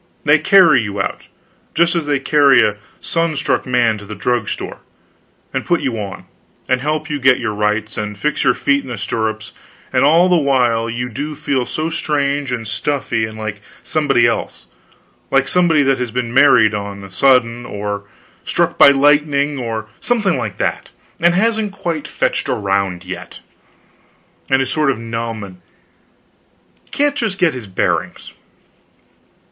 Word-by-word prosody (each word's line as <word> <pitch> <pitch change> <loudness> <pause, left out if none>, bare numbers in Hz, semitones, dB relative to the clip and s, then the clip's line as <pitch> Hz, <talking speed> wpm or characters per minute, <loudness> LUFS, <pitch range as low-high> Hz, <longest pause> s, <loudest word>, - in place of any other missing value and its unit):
They 150 +1 +5
carry 180 - +5
you 100 -2 -5
out, 95 - -3 0.5
just 170 +1 +3
as 165 -3 -1
they 145 -1 +2
carry 140 0 +4
a 105 0 -4 0.2
sun 165 -1 -1
struck - - -1
man 120 -4 +2
to 105 - -11
the 105 - -7
drug 115 +1 -1
store, - - -6 0.7
and - - -2
put 175 -2 0
you 125 -6 -2
on, 100 -2 -7 0.4
and 130 0 +1
help 155 +2 -2
get 130 -4 +3
you - - -7
to 110 - 0
rights, 105 +1 -1
and 105 -1 -5
fix 150 +8 -1
your - - +3
feet 140 0 +1
in 130 - -11
the 120 - -5
stirrups; 110 +1 -3 0.4
and - - +3
all 165 +5 +5
the 180 - +3
while 125 -6 +1
you 120 +2 -3
do 145 +6 -5
feel 135 -3 -2
so 160 +1 -3
strange 145 -4 -1
and 115 -3 -4
stuffy 115 -1 -1
and 110 0 -9
like 110 -1 -5 0.2
somebody 140 -6 +2
else 115 -1 -2 0.6
like 135 0 +2
somebody 170 -5 +3
that 135 -1 +1
has 125 -1 -2
been 120 0 -3
married 125 -6 +5
on 100 -1 -5
a 100 - -11
sudden, 120 +1 +2
or 100 -2 -5 0.4
struck - - -1
by - - +9
lightning, 145 0 +2
or 110 -3 -4
something 215 -7 +1
like 115 -7 -4
that, - - -2 0.3
and 170 +1 +3
hasn't 220 +1 +1
quite 165 -6 -4
fetched - - -1
around 100 -3 -1
yet, 95 - -8 1.1
and 135 0 +3
is 130 - -4
sort 155 -2 +1
of 135 - 0
numb, 115 -1 -5
and 90 -2 -12 1.3
can't 290 0 0
just 220 -7 -2
get 180 -5 +2
his 125 -5 -8
bearings. 95 - -2
130 Hz, 165 wpm, -17 LUFS, 110-150 Hz, 1.3 s, by